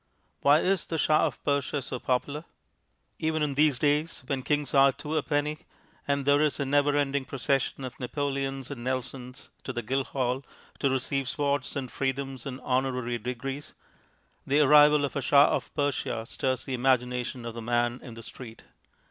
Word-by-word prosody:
Why 145 +3 +5
is 190 -1 +1
the 165 - -2
Shah 155 0 +3
of - - -8
Persia 145 0 0
so 125 0 -5
popular? 140 +5 -1 0.8
Even 155 -1 0
in 145 -2 0
these 145 -1 +3
days 150 +2 0
when 135 0 -2
kings 145 0 -1
are 135 -1 +6
two 150 +3 -5
a 155 - +3
penny, 150 +1 -1 0.5
and 140 -1 0
there 145 +1 +4
is 155 -1 +1
a 140 - 0
never 145 +1 +3
ending 140 -1 +1
procession 135 +1 -1
of 130 -1 -7
Napoleons 135 0 -3
and 120 -4 -6
Nelsons 130 0 -4
to - - -4
the 120 -2 -4
Guildhall 130 +1 -1 0.4
to 140 - +2
receive 135 0 -1
swords 140 -1 -1
and 130 -3 -4
freedoms 135 -1 -3
and 130 -1 -5
honorary 125 -2 -1
degrees, 135 +5 -5 0.7
the 145 +2 +3
arrival 150 0 +6
of 140 - -6
a 140 - 0
Shah 140 +2 +5
of - - -5
Persia 145 -6 -1
stirs 130 +1 -2
the 135 - -5
imagination 125 -1 0
of 115 - -5
the 115 - -6
man 120 +1 0
in 120 -4 -10
the 115 - -10
street. 115 0 -10
135 Hz, 175 wpm, -28 LUFS, 125-145 Hz, 0.8 s, are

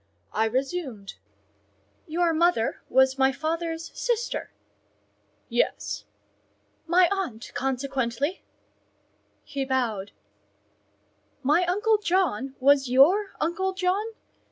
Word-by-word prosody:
I 220 - +2
resumed— 260 - -3 0.9
"Your 335 +1 +1
mother 320 -8 +1
was 265 +1 +3
my 265 0 +5
father's 325 +3 -3
sister?" 480 -1 -2 1.0
"Yes." - - -1 0.8
"My 355 +1 +5
aunt, 340 - -3
consequently?" 265 +3 -2 1.0
He 275 -1 -3
bowed. 235 -7 -1 1.3
"My 300 +7 +3
uncle 420 +4 +2
John 330 - 0
was 275 -1 +4
your 355 +11 +4
uncle 360 +4 -1
John? 375 +3 0
305 Hz, 85 wpm, -26 LUFS, 260-360 Hz, 1.3 s, my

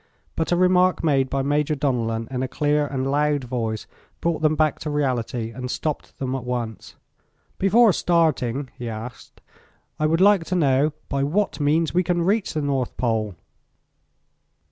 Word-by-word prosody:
But 160 - -1
a - - +4
remark 180 0 +3
made 135 -4 +2
by 135 -1 -1
Major 150 +2 +1
Donellan 115 -5 -1
in 125 -1 -2
a 130 - -1
clear 150 +1 +1
and 135 -1 -3
loud 145 -1 +1
voice 115 -3 -3 0.3
brought 165 -2 -1
them 155 0 +3
back 155 -1 +1
to 155 - -4
reality 125 -5 -1
and 125 +2 -6
stopped 150 +3 -4
them 130 -1 -3
at 135 -2 -3
once. 120 -4 -5 0.6
"Before 215 +2 +5
starting" 145 -7 +1
he 120 -1 -4
asked, 115 +2 -9 0.6
"I 155 - +2
would 165 +2 +1
like 200 -2 +5
to 185 - -2
know 145 -2 +2
by 140 -1 -1
what 165 +2 0
means 155 +3 +1
we 180 - +3
can 175 -1 0
reach 200 0 0
the 155 - -1
North 135 -3 -1
Pole?" 110 -5 -1
145 Hz, 165 wpm, -23 LUFS, 125-165 Hz, 0.6 s, Before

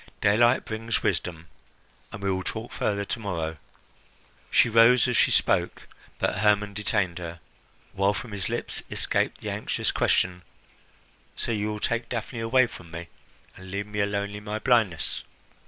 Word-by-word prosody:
Daylight 120 +4 +4
brings 115 +1 -2
wisdom, 85 -2 -1 0.7
and 100 - -8
we 100 - +1
will 95 0 -1
talk 110 +5 -5
further 100 -1 -1
to 115 - -3
morrow." 85 -6 -3 0.9
She - - +5
rose 115 +3 +6
as 125 - 0
she - - +5
spoke; - - +2 0.3
but 95 - 0
Hermon 105 0 +3
detained 100 -4 -1
her, 85 -1 -7 0.5
while 100 +1 +2
from 115 0 -6
his 100 -2 -3
lips - - -2
escaped - - 0
the - - -3
anxious - - -1
question, 90 0 +1 0.9
"So - - -2
you 105 -1 0
will 105 0 -3
take 120 +2 -1
Daphne 120 - -4
away 125 +3 +4
from 90 -7 -11
me, 85 +1 -7 0.5
and 95 0 -11
leave 100 +2 -3
me 105 0 -5
alone 100 0 0
in 105 0 -8
my 105 0 -3
blindness?" 110 - +1
105 Hz, 160 wpm, -26 LUFS, 95-115 Hz, 0.9 s, rose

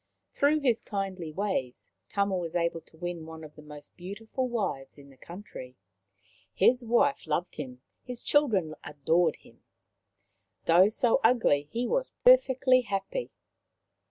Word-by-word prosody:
Through 300 +1 +2
his 245 -5 +2
kindly 195 -5 -4
ways 170 -9 -3 0.2
Tama 200 -1 0
was 170 -2 -4
able 170 -1 0
to 160 - -23
win 175 -1 -5
one 160 0 -9
of 150 -1 -11
the 150 - -13
most 150 -1 -13
beautiful 220 +8 -5
wives 185 - -3
in 140 -1 -15
the - - -18
country. 170 -6 -10 0.8
His 245 +6 +3
wife 240 - +1
loved 170 +4 -2
him, 125 -3 -7 0.2
his 250 -1 -6
children 210 - +2
adored 160 +3 +1
him. - - -21 1.0
Though 180 +4 +6
so 230 +2 +2
ugly, 220 - +3
he 240 +2 -2
was - - -1
perfectly 265 - +5
happy. 210 - -3
190 Hz, 140 wpm, -28 LUFS, 160-240 Hz, 1.0 s, Though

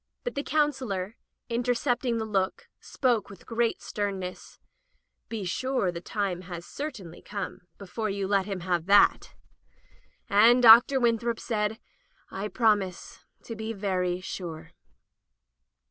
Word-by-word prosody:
But - - -3
the 280 - -2
Counselor, 260 -11 -1 0.3
inter 245 +1 0
cepting 245 -1 0
the 220 - -2
look, 210 - -1
spoke 240 -6 0
with 200 -3 -13
great 230 0 -1
sternness: 195 -3 -5 0.4
" - - -48
Be 225 -3 -4
sure 255 0 0
the 170 -1 -7
time 190 -2 -2
has 175 -1 -8
certainly 205 - -7
come 200 -3 -6
before 210 +3 -4
you 195 -1 -2
let 195 -1 +1
him 195 -3 -4
have 175 -1 -1
that." 200 +1 +4 0.9
And 230 +5 +5
Dr. 235 +4 +8
Winthrop 235 -1 +1
said: 215 -1 -1 0.5
"I 195 +2 -4
promise 205 -6 0 0.2
to 230 - -7
be 220 +1 -4
very 185 -3 -1
sure." 165 -3 -7
210 Hz, 130 wpm, -27 LUFS, 190-235 Hz, 0.9 s, Dr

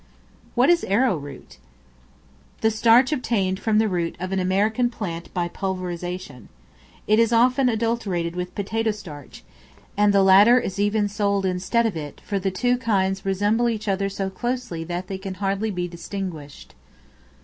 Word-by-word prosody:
What 255 +7 +5
is 345 - +2
Arrow 210 +1 +2
root? 145 -2 -10 1.0
The 220 - +3
starch 235 +5 +4
obtained 200 -9 0
from 220 -1 +1
the 220 0 +3
root 175 -4 -2
of 185 +1 -4
an 190 - 0
American 210 +6 +1
plant 175 -8 -6
by 175 -1 -1
pulverization. 180 - -5 0.6
It 215 +1 +3
is 230 0 +3
often 250 +3 +3
adulterated 215 -7 -1
with 180 0 -5
potato 220 +3 -1
starch, 170 -10 -8 0.5
and 205 0 +4
the 200 -1 +4
latter 205 +6 +7
is 195 -4 -5
even 205 +1 +1
sold 200 -1 0
instead 185 +6 0
of 220 - -1
it, 150 -2 -7
for 200 -2 -1
the 195 +1 -1
two 245 +6 0
kinds 195 -4 0
resemble 205 +5 +1
each 215 -2 -4
other 195 0 0
so 195 -1 -4
closely 240 -5 -3
that 175 +2 -4
they 190 0 -6
can 190 -1 -6
hardly 200 +2 -1
be 180 -3 -3
distinguished. 170 -4 -7
195 Hz, 160 wpm, -23 LUFS, 185-225 Hz, 1.0 s, latter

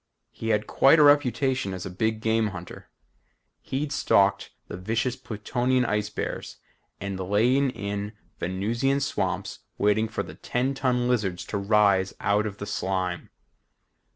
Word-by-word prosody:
He 115 - -5
had 105 -1 +2
quite 140 +4 +5
a 150 - +6
reputation 130 -7 +3
as 90 - -6
a - - -5
big 110 +4 -1
game 110 0 +2
hunter. 90 -3 -9 0.7
He'd 140 +2 -3
stalked 100 -8 +2 0.2
the - - -6
vicious 115 +7 -1
Plutonian 125 +1 -1
ice 105 -2 -1
bears - - -5 0.4
and 100 -1 -4
lain 120 +9 +2
in 100 -2 -4 0.3
Venusian 115 +10 0
swamps 140 - -2 0.2
waiting 105 +2 +2
for 110 - -3
the - - -10
ten 130 +3 -1
ton 125 -2 0
lizards 105 -8 0
to 100 - -3
rise 100 -2 +3
out 105 +1 +1
of 100 -1 -7
the 100 - -5
slime. 95 -2 -2
110 Hz, 145 wpm, -26 LUFS, 100-125 Hz, 0.7 s, a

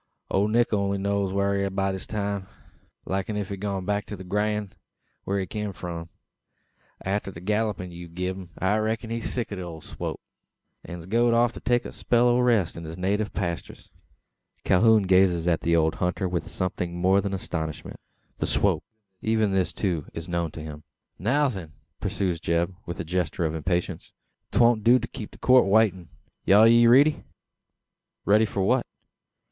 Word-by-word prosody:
"Ole 100 +2 +2
Nick 115 +1 +2
only 100 -1 +1
knows 100 0 0
whar 100 +1 +1
he 100 - 0
air 100 - 0
by 95 0 0
this 95 -1 -6
time. 100 -2 -3 0.6
Like 95 0 -2
enuf 105 -2 -3
gone 100 -2 -3
back 100 +1 -1
to 105 - -5
the 95 - -9
Grand, 105 +1 -1 0.5
whar 100 - 0
he 95 - -1
kim 105 +2 -4
from. 85 -2 -6 1.0
Arter 100 +1 -1
the 85 - -9
gallupin 105 -1 -1
ye've 85 -1 -10
gi'n 90 +1 -1
him, 95 -2 -9
I 95 +4 +1
reck'n 110 +1 -2
he 115 - -1
air - - -5
sick 120 0 -3
o' - - -3 0.2
the - - -17
swop; - - -5 0.6
an's 85 -1 -8
goed 115 +4 +2
off 120 0 +3
to - - -8
take 120 -1 +1
a - - -6
spell 120 0 +2
o' 120 +1 +3
rest 115 -9 +2
on 85 - -7
his 80 +2 -7
native 100 +3 0
pasters." 85 -4 -5 0.7
Calhoun 110 +3 +5
gazes 90 -2 +3
on 85 -2 +2
the 85 0 +2
old 80 -1 +3
hunter 90 +1 -1
with 90 -1 -3
something 90 -1 -2
more 95 +3 +3
than 100 - -3
astonishment. 80 -5 -5 0.4
The - - -1
swop! - - +1 0.4
Even 110 -2 +1
this, 95 -2 +1
too, 85 -7 -2
is 80 0 -6
known 85 -1 -1
to 80 - -7
him! 75 -1 -8 0.4
"Now, 140 +9 +2
then," 95 - -6 0.3
pursues 95 -3 -1
Zeb, 85 +2 0
with 85 - -5
a - - -1
gesture 85 -1 -1
of 80 - -1
impatience. 85 +1 -2 0.4
"'Twon't 120 -2 +4
do 120 +3 +6
to - - -4
keep 110 -5 -8
the - - -16
Court 130 0 +5
a - - -3
waitin'. 95 -5 +2 0.4
Are 105 +3 +8
ye 115 0 +6
riddy?" 145 +5 +5 1.0
"Ready 105 +2 +5
for 100 -2 -2
what?" - - +2
95 Hz, 185 wpm, -26 LUFS, 90-110 Hz, 1.0 s, Are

